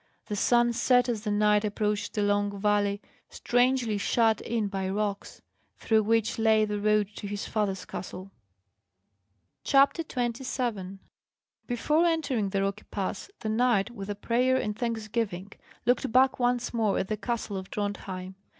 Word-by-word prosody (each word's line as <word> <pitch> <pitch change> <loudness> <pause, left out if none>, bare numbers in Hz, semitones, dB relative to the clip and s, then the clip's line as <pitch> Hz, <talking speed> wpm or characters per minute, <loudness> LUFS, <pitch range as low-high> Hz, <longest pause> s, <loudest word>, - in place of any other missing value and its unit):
The 210 - -4
sun 240 +3 +3
set 245 +1 +3
as 230 -3 -3
the - - 0
knight 210 0 +3
approached 210 0 -2
a 210 - +2
long 205 0 0
valley, 205 0 +1 0.3
strangely 245 -3 +1
shut 225 +1 +2
in 225 -3 -1
by 195 -1 -3
rocks, 205 0 -3 0.3
through 220 -1 +2
which 225 +1 +1
lay 220 -1 +4
the 210 -1 -3
road 210 -1 +2
to 205 - -5
his 205 0 -4
father's 195 -4 -2
castle. 185 +1 -7 1.3
CHAPTER 275 +4 +4
27 240 - -3 0.7
Before 300 +7 +2
entering 280 -11 0
the 195 0 0
rocky 200 +1 -3
pass, 195 - -4
the 220 - -3
knight, 230 -1 +2
with 200 -4 -8
a 205 - -2
prayer 245 +5 +1
and 210 -4 -2
thanksgiving, 215 -4 -3 0.3
looked 245 +1 +1
back 260 +2 +4
once 245 0 0
more 220 -4 +1
at 190 - -1
the 215 - -1
castle 225 -1 -3
of 190 -1 -6
Drontheim. 190 -2 -4
215 Hz, 150 wpm, -28 LUFS, 205-240 Hz, 1.3 s, lay